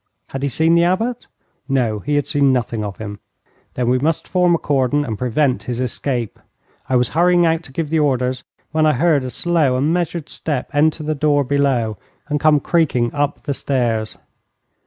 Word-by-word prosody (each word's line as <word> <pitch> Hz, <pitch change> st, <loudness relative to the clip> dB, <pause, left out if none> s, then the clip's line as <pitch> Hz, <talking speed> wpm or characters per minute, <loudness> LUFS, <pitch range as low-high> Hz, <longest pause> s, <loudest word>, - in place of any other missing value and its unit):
Had 135 Hz, -, -5 dB
he 140 Hz, -, 0 dB
seen 160 Hz, +5 st, +2 dB
the 170 Hz, 0 st, +4 dB
Abbot? 225 Hz, +8 st, -1 dB, 0.4 s
No, 120 Hz, -6 st, +1 dB
he 145 Hz, +9 st, -2 dB
had 145 Hz, -, +1 dB
seen 140 Hz, -2 st, +2 dB
nothing 115 Hz, -3 st, -1 dB
of 100 Hz, -2 st, -5 dB
him. 105 Hz, -2 st, -7 dB, 0.6 s
Then 125 Hz, -1 st, -1 dB
we 125 Hz, +1 st, +2 dB
must 155 Hz, +4 st, -1 dB
form 180 Hz, -2 st, +3 dB
a -, -, +1 dB
cordon 145 Hz, 0 st, 0 dB
and 110 Hz, -5 st, -3 dB
prevent 125 Hz, +3 st, 0 dB
his 120 Hz, -1 st, -3 dB
escape. 125 Hz, -2 st, -3 dB, 0.5 s
I 130 Hz, -, +1 dB
was 125 Hz, -1 st, +2 dB
hurrying 175 Hz, +2 st, +3 dB
out 165 Hz, 0 st, +1 dB
to -, -, -12 dB
give 155 Hz, +2 st, -3 dB
the 160 Hz, -, +2 dB
orders, 130 Hz, -3 st, 0 dB, 0.3 s
when 155 Hz, 0 st, +2 dB
I 155 Hz, -, +4 dB
heard 150 Hz, 0 st, +2 dB
a 130 Hz, -, -4 dB
slow 150 Hz, -1 st, +1 dB
and 145 Hz, +5 st, +1 dB
measured 170 Hz, -2 st, -2 dB
step 145 Hz, -5 st, -3 dB
enter 155 Hz, +2 st, +2 dB
the 155 Hz, +1 st, -1 dB
door 145 Hz, -1 st, +2 dB
below, 130 Hz, -6 st, 0 dB, 0.3 s
and 150 Hz, 0 st, 0 dB
come 155 Hz, -1 st, +4 dB
creaking 135 Hz, -8 st, +1 dB
up 145 Hz, 0 st, -1 dB
the 145 Hz, -, -2 dB
stairs. 120 Hz, -6 st, -1 dB
140 Hz, 195 wpm, -19 LUFS, 125-160 Hz, 0.6 s, the